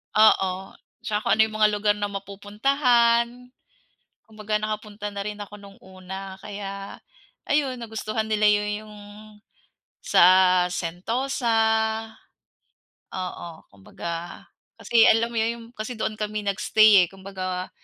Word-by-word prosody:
Oo, 190 -3 +3 0.3
tsaka 210 -1 -1
kung - - +2
ano 220 - +4
yung 220 -1 -3
mga 215 0 +5
lugar 205 0 +1
na 205 0 -2
mapupuntahan. 235 +4 +1 0.7
Kumbaga, 215 -1 -3
nakapunta 210 -1 -5
na 200 0 -5
rin 210 +1 -5
ako 205 +1 -9
nung 200 -1 -14
una 190 +1 -9
kaya 200 -1 -7 0.5
ayun, 285 -3 +1
nagustuhan 220 -1 -4
nila 215 -1 +2
yun 210 0 +2 0.2
yung 210 - -12 1.1
sa - - +3 0.5
Sentosa. 230 +10 -2 1.6
Oo, 175 -3 -6
kumbaga 165 - -7 0.3
kasi 230 -1 +3
alam 230 +1 +4
mo 235 - -6
yun 225 +1 +1
yung - - -12
kasi 215 +3 -4
doon 215 -1 -3
kami 210 0 -3
nag-stay, 205 0 +5
eh. - - -13
Kumbaga, 185 -1 -6
210 Hz, 125 wpm, -24 LUFS, 195-220 Hz, 1.6 s, mga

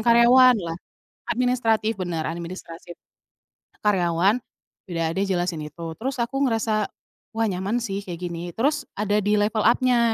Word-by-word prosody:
karyawanlah. 235 -6 +5 0.5
Administratif, 230 -3 +1
benar, 170 -3 -2
administrasi 170 0 -7 0.9
karyawan. 190 +3 +2 0.5
Ya, 165 -2 -1
dia 195 - +2
jelasin 175 -4 -1
itu, 160 +2 -7
terus 255 +1 -3
aku 270 +4 0
ngerasa, 220 -3 +1 0.5
"Wah 225 0 +1
nyaman 195 +6 -1
sih 200 -3 -4
kayak 175 -2 -6
gini," 175 -1 -5
terus 285 - 0
ada 205 0 0
di 210 0 +1
level 210 +1 +1
up-nya 235 -1 +3
210 Hz, 130 wpm, -24 LUFS, 175-235 Hz, 0.9 s, karyawanlah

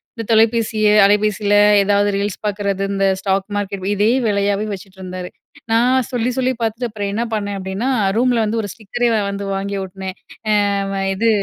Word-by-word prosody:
இந்த 230 - -5
தொலைபேசிய 220 -1 +3 0.2
அலைபேசில 205 0 +2 0.3
ஏதாவது 205 +1 +2
ரீல்ஸ் 200 -1 -2
பாக்கறது 200 -1 -1
இந்த 195 0 +1 0.2
ஸ்டாக் 195 -1 0
மார்க்கெட் 200 -2 -3
இதே 205 +2 +2 0.2
வேலயாவே 200 0 0
வச்சுட்ருந்தாரு. 185 -1 -8 0.4
நான் 250 +3 +3
சொல்லி 245 -1 0
சொல்லி 260 0 +1
பாத்துட்டு 225 +2 -1
அப்றம் 205 -2 -4
என்ன 230 +3 0
பண்ணே 205 -2 -2
அப்டினா 190 +6 -3 0.3
ரூம்ல 240 -1 +2
வந்து 220 +2 -1
ஒரு 205 - -5
ஸ்டிக்கரே 240 +3 -2
அ - - 0
வந்து 200 0 -4
வாங்கி 200 +1 -3
ஒட்டுனே. 190 0 -6 0.9
அ - - -1
இது 225 +4 +2
205 Hz, 155 wpm, -19 LUFS, 195-225 Hz, 0.9 s, தொலைபேசிய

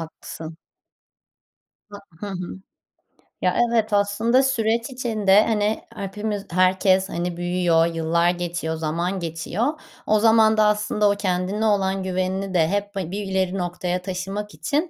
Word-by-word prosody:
Haklısın. 160 0 -8 1.3
Ha 205 - -9 0.2
Hı 205 - -5
hı. 185 -1 -6 0.9
Ya, - - +2
evet, 225 -2 +1
aslında 220 +6 +3
süreç 230 -1 0
içinde, 215 -5 +3
hani, 215 -1 0
hepimiz, 205 +1 -4
herkes 185 +1 +3
hani 175 0 -3
büyüyor, 175 -2 +2
yıllar 170 +1 +1
geçiyor, 175 -2 -2
zaman 170 +4 -2
geçiyor. 170 +6 -3 0.4
O 215 0 +4
zaman 220 0 +5
da 215 - +5
aslında 210 0 +2
o 200 - +2
kendine 190 +2 -1
olan 195 -2 +1
güvenini 185 +1 -2
de 165 -3 +3
hep 205 +2 -2
ha 180 -3 -3
bir 205 +1 -3
ileri 190 0 -1
noktaya 180 0 -2
taşımak 195 +3 -5
için 285 - -1
190 Hz, 135 wpm, -23 LUFS, 175-210 Hz, 1.3 s, zaman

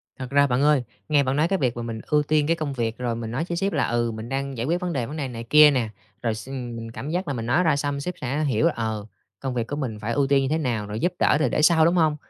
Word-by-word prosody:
Thật 130 -1 -7
ra, 140 +1 +4
bạn 125 +1 +1
ơi, 145 -3 +4 0.3
nghe 145 -2 +4
bạn 130 +1 0
nói 155 +3 +3
cái 195 +1 0
việc 125 -4 0
mà - - -3
mình 115 -1 -5
ưu 150 -1 +3
tiên 150 0 +1
cái 165 - +3
công 155 -4 -3
việc, 115 -2 -2
rồi 120 -2 -2
mình 115 -1 -5
nói 135 +7 -1
với 170 - -1
sếp 195 +2 0
là, - - +1
ừ, 120 -1 0
mình 110 +1 -7
đang 135 0 -3
giải 115 - -2
quyết 175 +3 0
vấn 180 -1 -2
đề, 125 -5 -1
vấn 150 +6 -7
đề 140 -3 -2
này 115 -2 -7
kia 150 0 +8
nè, 125 -5 0 0.3
rồi 115 -2 0
s 120 +4 -9
mình 120 -4 -6
cảm 135 +5 -6
giác 180 +4 -2
là 145 - -1
mình 115 -3 -4
nói 130 +10 +2
ra 165 - +3
xong 140 0 -2
sếp 180 +5 -3
sẽ 135 +5 -1
hiểu 145 +2 +1
là, 170 - +3
ờ, 110 -2 -3 0.3
công 135 -1 -3
việc 120 -2 -2
của 145 - -3
mình 125 -8 -4
phải 110 +2 -3
ưu 140 -1 +2
tiên 140 0 +3
như 135 - -1
thế 155 - +1
nào, 120 -9 -2
rồi 105 +2 -4
giúp 175 +1 0
đỡ - - +4
thi 155 - +2
để - - 0
sau, 160 0 +5
đúng 170 - +3
hông? 160 -3 +3
135 Hz, 325 wpm, -24 LUFS, 120-150 Hz, 0.3 s, kia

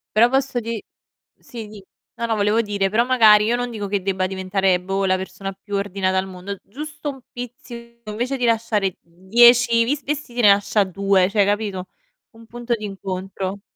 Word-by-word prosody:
Però 230 +3 +6
posso 270 -1 0
di 230 -2 -4 0.6
sì 230 -3 -9
dì. 210 -1 -12 0.3
No, 235 - -3
no, 225 - 0
volevo 210 +2 +2
dire, 200 -3 -1
però 230 +4 +2
magari 220 -5 +6
io 235 +2 +2
non 245 0 -3
dico 215 -3 -5
che 200 -1 -1
debba 190 -1 0
diventare 190 0 0
boh 195 +1 -1
la 185 0 +2
persona 195 +1 -6
più 205 +2 -9
ordinata 195 -1 -1
al 190 - -1
mondo, 190 +1 -7
giusto 300 +6 -7
un 270 -2 -6
pizzico, 235 -2 -9
invece 245 +6 -2
di 250 - -2
lasciare 220 -5 +1
10, 230 +7 +4
di 285 +6 0
vestiti 275 -4 -3
ne 210 - +7
lascia 205 +1 +3
2, 195 0 +1
cioè 205 -1 +3
capito? 205 -3 -2 0.4
Un 230 -1 -17
punto 240 +1 -3
d'incontro. 195 -2 -5
210 Hz, 180 wpm, -21 LUFS, 195-235 Hz, 0.6 s, ne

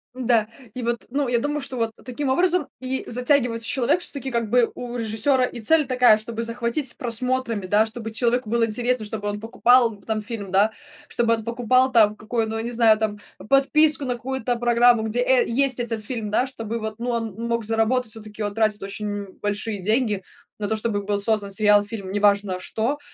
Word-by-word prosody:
М-да, 240 -4 +2 0.3
и 250 - -6
вот, 235 0 -2
ну, 280 +2 -1
я 240 -1 +2
думаю, 295 +4 -2
что 265 -2 -6
вот 230 -1 -1
таким 260 +3 -4
образом 350 +3 +2
и 260 0 -3
затягивается 245 -2 +1
человек. 260 +8 +1
Всё-таки, 280 -6 -4
как 235 -3 -2
бы, 245 0 +3
у 245 0 -6
режиссёра 235 +4 +2
и 245 - -7
цель 305 +5 +3
такая, 250 -4 +5
чтобы 230 +1 -5
захватить 235 +4 -1
просмотрами, 240 -3 -1
да, 210 +4 +3
чтобы 225 0 -7
человеку 235 +1 0
было 235 0 +2
интересно, 235 +1 -1
чтобы 210 -1 -4
он 205 0 -4
покупал, 235 +1 +3
э, - - -24
там 220 -1 -2
фильм, 205 -3 -7
да. 200 +3 +3 0.4
Чтобы 230 -1 +1
он 225 - -7
покупал 250 +2 +2
там 215 -3 +5
какую 220 +1 -2
ну, 220 - -3
я 225 - -3
не 235 - -4
знаю, 225 -2 +4
там 215 -1 -2 0.3
подписку 295 +2 +4
на 250 -1 -1
какую-то 250 0 -3
программу, 240 -1 +4
где, 220 +3 -1
э, 250 0 +3
есть 260 +1 +1
этот 230 -2 -3
фильм, 220 -2 -4
да, 215 +4 +2
чтобы 230 -3 -5
вот, 220 -1 -5
ну, 240 +1 -3
он 225 -3 -2
мог 235 -1 -1
заработать. 225 +2 0
Всё-таки 215 -1 -7
он 205 -1 -3
тратит 215 -1 0
очень, 200 +2 -5
м, 205 -2 -5
большие 205 0 -3
деньги 215 -1 0 0.4
на 205 - -2
то, 220 - 0
чтобы 215 -1 -2
был 205 0 -1
создан 205 -1 0
сериал, 205 0 +4
фильм, 205 -2 -7
неважно 200 -2 +2
что, 230 +9 -2
230 Hz, 200 wpm, -23 LUFS, 215-250 Hz, 0.4 s, такая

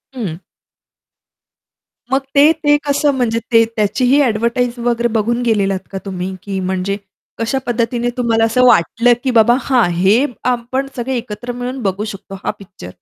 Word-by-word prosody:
हं. 185 -9 -4 1.7
मग 270 +1 +2
ते 295 +3 +7
ते 290 0 +5
कसं 285 +1 +2
म्हणजे 230 -2 0
ते 230 0 +6
त्याचीही 250 +6 +2
एडव्हर्टाइज 235 +1 0
वगैरे 240 0 0
बघून 235 +3 0
गेलेलात 200 -4 +1
का 195 - -4
तुम्ही? 185 0 -4
की 195 -1 -4
म्हणजे 190 +2 -2 0.4
कशा 230 +4 -1
पद्धतीने 240 0 -1
तुम्हाला 230 -2 +1
असं 250 +3 +2
वाटलं, 240 +3 +4
की 260 - +1
बाबा 235 +1 +5
हां, 245 -6 +2
हे 200 +10 +3 0.2
आपण 250 +2 -1
सगळे 250 +1 -2
एकत्र 235 +1 -6
मिळून 250 +1 -5
बघू 195 +1 -1
शकतो 195 0 -10
हा - - 0
पिक्चर? 185 - -11
235 Hz, 150 wpm, -17 LUFS, 200-250 Hz, 1.7 s, ते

